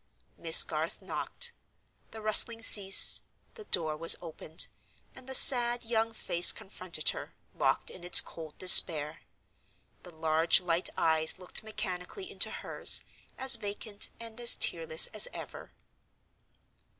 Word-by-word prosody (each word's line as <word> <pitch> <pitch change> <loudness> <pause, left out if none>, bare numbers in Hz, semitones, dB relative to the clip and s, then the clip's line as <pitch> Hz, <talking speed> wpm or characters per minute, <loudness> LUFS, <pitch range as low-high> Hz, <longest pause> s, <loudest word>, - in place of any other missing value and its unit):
Miss - - +4
Garth - - -9
knocked. 485 -1 -9 0.6
The 220 - -15
rustling 225 +1 0
ceased; 195 -3 +6 0.3
the 440 -3 -17
door 160 - -4
was 165 +2 +1
opened, 160 -1 -6 0.5
and 260 0 -19
the 265 - -4
sad 240 -2 +3
young 225 -1 -6
face 175 -5 +2
confronted 180 -5 -7
her, - - -11 0.2
locked - - -5
in 180 - -17
its 175 - +7
cold 160 -2 -9
despair; 155 -5 +6 0.8
the - - -18
large 160 +1 -3
light 175 -1 -6
eyes 160 +1 -3
looked 180 -1 -6
mechanically 215 - -11
into - - -1
hers, - - -1 0.3
as 265 0 0
vacant 205 -1 -6
and 230 0 -13
as 240 - +1
tearless 480 0 -1
as - - -1
ever. - - -15
195 Hz, 130 wpm, -24 LUFS, 165-235 Hz, 0.8 s, its